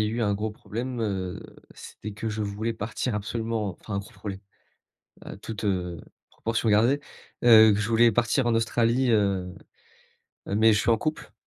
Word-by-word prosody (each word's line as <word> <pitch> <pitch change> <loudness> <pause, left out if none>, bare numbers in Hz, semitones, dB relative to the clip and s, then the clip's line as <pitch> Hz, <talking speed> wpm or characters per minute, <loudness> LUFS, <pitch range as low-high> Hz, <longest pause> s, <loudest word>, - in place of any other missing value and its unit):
a - - +1
eu 115 +2 -2
un 100 -2 +1
gros 105 +2 -2
problème, 120 +4 -6
heu, 95 -4 -3 0.4
c'était 105 - -9
que 110 +2 -4
je 110 0 -4
voulais 105 +2 -2
partir 115 +1 -3
absolument 110 -1 -2
enfin, 100 -2 -4
gros 100 - -9
problème, 100 -2 -7 0.9
heu, - - -8
toute, 110 +1 -7
heu, 90 -4 -2 0.3
proportion 115 0 -2
gardée. 115 +7 +4 0.5
Heu, 110 -2 +9
que 100 - -1
je 105 - -1
voulais 115 +1 +5
partir 120 +3 +1
en 120 - +2
Australie, 115 +2 +1
heu, 95 -4 +1 0.9
mais 110 +2 +3
je 105 - +2
suis 115 - +1
en 115 - +3
couple, 155 +5 -4
110 Hz, 175 wpm, -26 LUFS, 100-115 Hz, 0.9 s, Heu